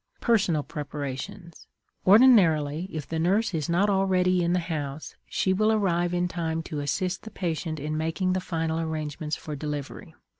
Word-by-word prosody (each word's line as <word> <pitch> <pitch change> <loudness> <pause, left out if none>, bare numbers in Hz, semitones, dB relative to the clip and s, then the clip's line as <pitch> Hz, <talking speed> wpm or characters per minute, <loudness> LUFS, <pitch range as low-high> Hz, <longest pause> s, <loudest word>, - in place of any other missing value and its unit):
PERSONAL 195 -10 +2
PREPARATIONS. 150 +5 -6 0.4
Ordinarily, 185 - +5
if 155 -3 -5
the 160 - -3
nurse 200 +6 +1
is 155 -2 -2
not 180 +4 +3
already 185 -2 +2
in 170 - +1
the - - +3
house, 155 -4 -5
she 190 - +1
will 215 +3 +3
arrive 175 -5 +1
in 180 0 0
time 165 -2 -3
to 155 -3 -5
assist 180 +6 -2
the 220 - -9
patient 165 -5 -3
in 150 +2 -3
making 165 +4 0
the 185 - -1
final 165 -2 -2
arrangements 155 -1 -3
for 150 - -7
delivery. 150 +4 -6
165 Hz, 160 wpm, -26 LUFS, 155-185 Hz, 0.4 s, Ordinarily